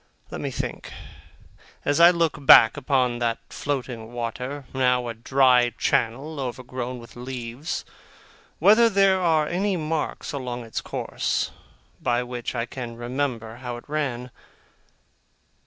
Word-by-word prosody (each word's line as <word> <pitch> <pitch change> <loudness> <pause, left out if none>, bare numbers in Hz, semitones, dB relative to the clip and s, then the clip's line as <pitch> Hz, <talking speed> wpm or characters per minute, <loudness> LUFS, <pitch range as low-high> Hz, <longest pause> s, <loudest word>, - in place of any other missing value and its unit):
Let - - -5
me - - -2
think, - - -5 0.9
as 145 +2 +2
I 170 +1 +9
look 165 -4 0
back 110 -4 +8
upon 130 -4 +1
that 115 -1 0
flowing 125 -5 -4
water, 125 +4 -5
now 125 -2 +2
a - - -3
dry 125 0 +3
channel 135 +7 0
overgrown 125 -1 -4
with 115 -1 -13
leaves, 125 +3 -5 0.7
whether 220 +7 +6
there 195 -2 +3
are 160 -3 +3
any 190 +3 0
marks 155 -2 -3
along 125 -3 -4
its 115 - -4
course, - - -2 0.5
by 120 0 +1
which 125 0 -5
I 115 -1 -1
can 120 -2 -7
remember 120 -2 -3
how 125 -1 -5
it 120 - -13
ran. 130 -5 -3
125 Hz, 130 wpm, -24 LUFS, 120-145 Hz, 0.9 s, I